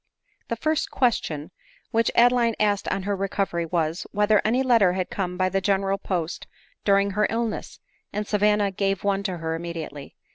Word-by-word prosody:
The 230 - -2
first 310 +6 0
question 165 - 0 0.4
which 230 0 +2
Adeline 235 -1 +4
asked 205 -2 +1
on 195 - -1
her 200 +1 -1
recov 195 0 -1
ery 170 -1 -1
was, 165 0 -1
Whether 210 +1 +3
any 245 +5 +2
letter 230 -8 +4
had 185 -1 -3
come 180 -2 -3
by 185 0 +2
the 195 +1 0
general 195 0 +1
post 175 -3 -3 0.4
during 200 0 +3
her 210 +1 +2
illness; 230 -1 -3 0.3
and 210 +1 -3
Savanna 210 -1 +2
gave 195 0 -1
one 200 -1 +1
to 190 -3 -3
her 160 0 -3
immediately. 165 -4 -6
195 Hz, 175 wpm, -25 LUFS, 180-210 Hz, 0.4 s, Adeline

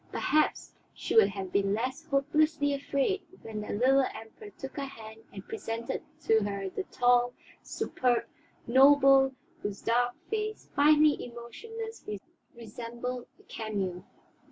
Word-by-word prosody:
Perhaps 305 0 +1 0.2
she - - -4
would 220 -3 +8
have 195 -2 -6
been 200 0 +2
less 260 +8 -3
hopelessly 290 +1 +2
afraid 280 +7 0 0.2
when 215 -1 -5
the 210 - -5
little 265 +5 +4
Emperor 225 - -10
took 270 -1 -7
her 280 - -2
hand 220 -4 -11
and 195 -1 -10
presented 230 +1 -4 0.2
to 225 -6 +4
her 200 -2 -3
the 385 - -4
tall, 245 0 +2 0.3
superb 245 -2 0 0.4
noble 270 +1 +6 0.3
whose 205 -6 -5
dark 245 +1 +2 0.2
face, 430 0 -3
finely 300 +1 +5
emotionless, 445 - -8 0.5
resembled 235 +2 -6
a - - -20
cameo. 195 -5 -4
245 Hz, 130 wpm, -29 LUFS, 220-285 Hz, 0.5 s, would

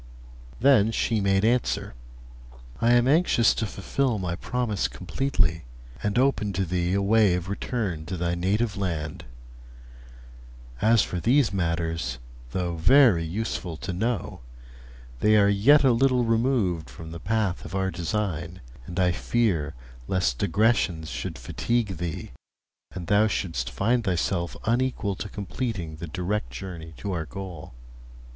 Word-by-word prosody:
Then 115 -4 +5
she 115 -1 0
made 95 +1 +2
answer: 120 - 0 0.9
'I 115 +1 +4
am 120 0 +4
anxious 145 -6 +4
to 110 - -2
fulfil 120 +5 -1
my 90 -3 -2
promise 115 0 -1
completely, 90 - -1 0.4
and 105 +1 -1
open 125 -6 +2
to 95 +1 0
thee 90 +1 0
a 100 - +1
way 105 -2 +4
of 90 0 -4
return 100 -6 -3
to 90 +1 -4
thy 85 0 -1
native 100 +5 0
land. 85 -6 -3 1.6
As 110 -1 +5
for 90 - -3
these 120 - +3
matters, 85 -6 -1 0.3
though 85 +4 -2
very 115 - +5
useful 90 -1 -3
to 90 - -5
know, 110 +2 -2 0.8
they 105 +7 +4
are 100 -1 +5
yet 120 +10 +5
a 130 - +5
little 125 +1 +3
removed 115 -8 +1
from 80 0 -10
the 85 - -7
path 105 -1 -1
of - - -7
our 95 0 0
design, 85 0 -3 0.3
and 90 +1 -4
I 90 -1 +3
fear 90 -6 0 0.3
lest 65 -10 0
digressions 95 -5 +1
should - - -5
fatigue 115 -6 -1
thee, 85 -2 -5 0.6
and 90 -2 -6
thou 105 +5 +4
shouldst 80 - -2
find 120 +4 +1
thyself 90 -2 -1
unequal 120 -3 0
to 105 - -5
completing 100 -5 -4
the 85 - -6
direct 90 -3 -2
journey 80 +3 -8
to 100 - -4
our 80 -3 -3
goal.' 90 -8 -8
95 Hz, 140 wpm, -26 LUFS, 85-115 Hz, 1.6 s, Then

